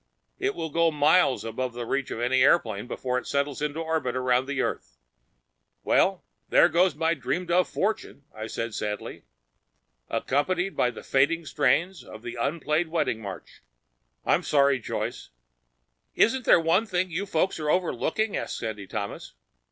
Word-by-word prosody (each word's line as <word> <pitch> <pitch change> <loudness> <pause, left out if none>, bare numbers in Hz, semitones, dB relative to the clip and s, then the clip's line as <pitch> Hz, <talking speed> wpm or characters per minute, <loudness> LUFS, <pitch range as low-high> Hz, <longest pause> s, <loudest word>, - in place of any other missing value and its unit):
It 395 +1 -1
will 160 - -4
go 165 +2 +3
miles 150 -1 +3
beyond 120 +2 -4
the 120 -1 -4
reach 135 +3 -1
of - - -5
any 125 +2 +2
airplane 115 -7 +3
before 125 0 -2
it - - -12
settles 140 0 -1
into 150 +2 -2
an - - -5
orbit 160 -6 -1
around 130 +1 +1
earth." 140 - -3 0.9
"Well, - - +2 0.3
there - - +6
goes 175 -2 +3
my 165 +2 +1
dreamed 170 +4 -3
of 180 +1 +3
fortune," 205 -8 -2
I 110 0 -6
said 115 0 -4
sadly. 105 -1 -5 0.8
"Accompanied 180 +7 0
by 125 - +2
the - - -9
fading 160 +5 +2
strains 160 +6 +1
of 110 +1 -12
an 120 - -5
unplayed 155 +4 0
wedding 160 -9 -1
march. 95 -6 -9 0.6
I'm - - +3
sorry, 140 -2 +3
Joyce." - - -4 0.9
"Isn't 255 +2 +3
there - - +6
one 170 +7 +2
thing 185 -2 -1
you 190 +5 -3
folks 185 0 0
are 150 -1 -2
overlooking?" 185 - 0
asked - - -3
Sandy 110 -3 -5
Thomas. 100 - -6
145 Hz, 160 wpm, -26 LUFS, 125-170 Hz, 0.9 s, there